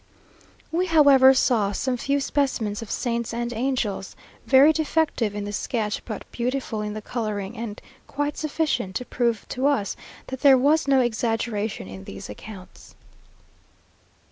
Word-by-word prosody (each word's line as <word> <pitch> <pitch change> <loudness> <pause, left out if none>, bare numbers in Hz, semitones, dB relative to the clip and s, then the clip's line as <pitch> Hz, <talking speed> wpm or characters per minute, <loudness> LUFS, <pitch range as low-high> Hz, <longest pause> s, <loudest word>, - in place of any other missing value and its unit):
We, 355 +3 0
however, 285 -5 +7
saw 220 -6 +2
some 255 +5 -1
few 275 +4 0
specimens 250 -8 -1
of 225 - -8
saints 235 -1 -2
and 240 0 -2
angels, 230 -5 -2 0.3
very 275 +4 +7
defective 310 -9 0
in 205 - -3
the 205 0 -5
sketch, 210 0 -2
but 215 -4 -6
beautiful 245 -2 -2
in 210 0 -4
the 215 - -6
colouring, 215 -3 -4
and 225 -3 -6 0.3
quite 290 +1 -2
sufficient 290 -10 -1
to 250 - -3
prove 235 -4 -1
to 260 +2 0
us 230 -9 0 0.3
that 260 -1 -7
there 275 -2 +7
was 290 +3 +3
no 270 -1 +4
exaggeration 225 - -1
in 95 0 -9
these 95 +1 -8
accounts. 185 - -12
235 Hz, 145 wpm, -24 LUFS, 210-275 Hz, 0.3 s, however